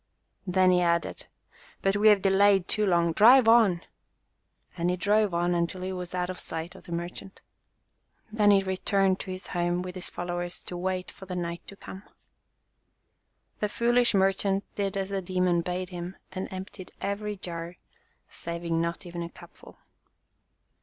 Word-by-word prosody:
Then 185 Hz, 0 st, +4 dB
he 180 Hz, 0 st, +3 dB
added, 170 Hz, -1 st, 0 dB, 0.6 s
"But 195 Hz, +1 st, +2 dB
we 210 Hz, +1 st, +4 dB
have 205 Hz, -3 st, +6 dB
delayed 195 Hz, -1 st, +4 dB
too 215 Hz, -1 st, +2 dB
long. 170 Hz, -2 st, +2 dB
Drive 240 Hz, +6 st, +7 dB
on 220 Hz, -7 st, +5 dB, 0.5 s
!" -, -, -40 dB
And 175 Hz, 0 st, 0 dB
he 180 Hz, -, +1 dB
drove 210 Hz, +2 st, +2 dB
on 175 Hz, +1 st, +1 dB
until 175 Hz, +2 st, -1 dB
he 190 Hz, 0 st, -3 dB
was 180 Hz, -1 st, -5 dB
out 180 Hz, 0 st, -1 dB
of 185 Hz, -, -8 dB
sight 165 Hz, +2 st, -5 dB
of 190 Hz, -, -15 dB
the 175 Hz, -, -11 dB
mer 170 Hz, 0 st, -2 dB
chant. 190 Hz, +2 st, -10 dB, 0.9 s
Then 210 Hz, -1 st, +3 dB
he 195 Hz, -1 st, +5 dB
returned 190 Hz, 0 st, +1 dB
to -, -, -7 dB
his 185 Hz, 0 st, -6 dB
home 175 Hz, 0 st, 0 dB
with 180 Hz, 0 st, -6 dB
his 185 Hz, -1 st, -4 dB
fol 175 Hz, -, -6 dB
lowers 175 Hz, 0 st, -4 dB
to 180 Hz, -, -7 dB
wait 185 Hz, +1 st, -3 dB
for 190 Hz, -, -13 dB
the 180 Hz, -, -5 dB
night 170 Hz, -1 st, -3 dB
to 200 Hz, -, -10 dB
come. 190 Hz, -1 st, -10 dB, 1.6 s
The 210 Hz, -, 0 dB
foolish 240 Hz, +1 st, +3 dB
merchant 195 Hz, +1 st, +2 dB
did 200 Hz, -1 st, -2 dB
as 195 Hz, 0 st, -2 dB
the 195 Hz, -1 st, -1 dB
demon 180 Hz, -1 st, +1 dB
bade 180 Hz, +1 st, -3 dB
him 180 Hz, 0 st, -6 dB, 0.2 s
and 190 Hz, 0 st, -5 dB
emptied 185 Hz, 0 st, -8 dB
every 205 Hz, +1 st, -3 dB
jar, 170 Hz, -1 st, -6 dB, 0.5 s
saving 170 Hz, -1 st, -3 dB
not 170 Hz, +1 st, -3 dB
even 175 Hz, 0 st, -6 dB
a 170 Hz, -, -5 dB
cupful. -, -, -16 dB
185 Hz, 175 wpm, -27 LUFS, 175-195 Hz, 1.6 s, Drive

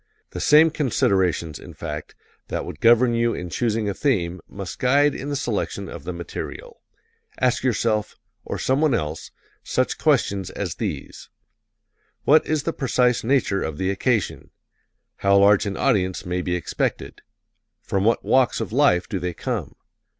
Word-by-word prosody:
The -, -, -6 dB
same 155 Hz, +2 st, +6 dB
considerations, 95 Hz, -, 0 dB
in -, -, -12 dB
fact, 75 Hz, -2 st, -6 dB, 0.3 s
that -, -, -3 dB
would 75 Hz, -, -8 dB
govern 120 Hz, +1 st, +5 dB
you 115 Hz, 0 st, +1 dB
in 90 Hz, -1 st, -6 dB
choosing 110 Hz, -1 st, 0 dB
a 100 Hz, -, -1 dB
theme 95 Hz, -, -1 dB
must 95 Hz, -2 st, -7 dB
guide 140 Hz, +3 st, +3 dB
in 140 Hz, -, -5 dB
the 145 Hz, -, -2 dB
selection 140 Hz, -, -2 dB
of -, -, -9 dB
the -, -, -3 dB
material. 485 Hz, -2 st, -7 dB, 0.6 s
Ask 125 Hz, -1 st, +1 dB
yourself 110 Hz, -4 st, 0 dB, 0.3 s
or -, -, -4 dB
someone 135 Hz, 0 st, +2 dB
else 75 Hz, -2 st, -4 dB, 0.3 s
such -, -, -1 dB
questions 95 Hz, -3 st, +1 dB
as -, -, -4 dB
these: -, -, -5 dB, 0.9 s
What 155 Hz, +2 st, +5 dB
is 155 Hz, -2 st, 0 dB
the 165 Hz, -, -2 dB
precise 125 Hz, -3 st, +1 dB
nature 115 Hz, -6 st, +1 dB
of 80 Hz, -2 st, -4 dB
the 95 Hz, +2 st, 0 dB
occasion? 110 Hz, +2 st, -1 dB, 0.7 s
How 100 Hz, 0 st, +3 dB
large 100 Hz, +1 st, +5 dB
an 100 Hz, -, -3 dB
audience 95 Hz, -1 st, +1 dB
may 90 Hz, 0 st, -2 dB
be 90 Hz, 0 st, -1 dB
expected? 90 Hz, -, -3 dB, 0.6 s
From 95 Hz, -1 st, -1 dB
what 115 Hz, +2 st, +2 dB
walks 130 Hz, -2 st, +3 dB
of -, -, -4 dB
life 125 Hz, -10 st, +3 dB
do 95 Hz, -, -3 dB
they 90 Hz, -1 st, -4 dB
come? -, -, -4 dB
110 Hz, 155 wpm, -23 LUFS, 90-130 Hz, 0.9 s, same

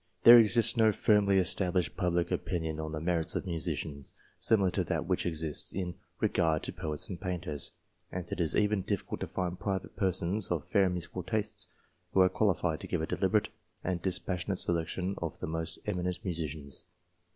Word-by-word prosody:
There 120 Hz, +1 st, +11 dB
exists 115 Hz, +1 st, +6 dB
no 110 Hz, -2 st, +5 dB
firmly 100 Hz, -2 st, +3 dB
established 90 Hz, -1 st, +1 dB
public 90 Hz, -2 st, 0 dB
opinion 80 Hz, -2 st, -2 dB
on 80 Hz, 0 st, -4 dB
the 75 Hz, -, -3 dB
merits 85 Hz, 0 st, +1 dB
of -, -, -2 dB
musicians, 75 Hz, -4 st, -2 dB, 0.2 s
similar 100 Hz, -4 st, +3 dB
to 95 Hz, -, 0 dB
that 85 Hz, -3 st, -1 dB
which 90 Hz, 0 st, 0 dB
exists 80 Hz, -3 st, -1 dB
in 90 Hz, -2 st, -3 dB, 0.3 s
regard 80 Hz, -3 st, +1 dB
to -, -, -3 dB
poets 75 Hz, -2 st, -2 dB
and 95 Hz, -1 st, -7 dB
painters, 90 Hz, -6 st, -2 dB, 0.4 s
and 90 Hz, -1 st, -5 dB
it -, -, -2 dB
is 80 Hz, -, +1 dB
even 105 Hz, -1 st, +2 dB
difficult 100 Hz, +1 st, -3 dB
to -, -, -3 dB
find 90 Hz, -1 st, -3 dB
private 95 Hz, -1 st, -3 dB
persons 95 Hz, +1 st, 0 dB
of 85 Hz, -4 st, -2 dB
fair 100 Hz, -3 st, +3 dB
musical 90 Hz, +1 st, -4 dB
tastes, 105 Hz, +3 st, -2 dB, 0.5 s
who 95 Hz, -, +5 dB
are 95 Hz, -, +6 dB
qualified 90 Hz, -7 st, +1 dB
to -, -, -7 dB
give -, -, -1 dB
a -, -, +1 dB
deliberate -, -, +1 dB, 0.3 s
and 90 Hz, -2 st, -2 dB
dis 95 Hz, 0 st, +1 dB
passionate 95 Hz, +1 st, -3 dB
selection 90 Hz, +3 st, -1 dB
of 85 Hz, -3 st, -4 dB
the -, -, -5 dB
most 80 Hz, +1 st, -3 dB
eminent 90 Hz, -3 st, -2 dB
musicians. 80 Hz, -5 st, -3 dB
90 Hz, 180 wpm, -31 LUFS, 80-95 Hz, 0.5 s, There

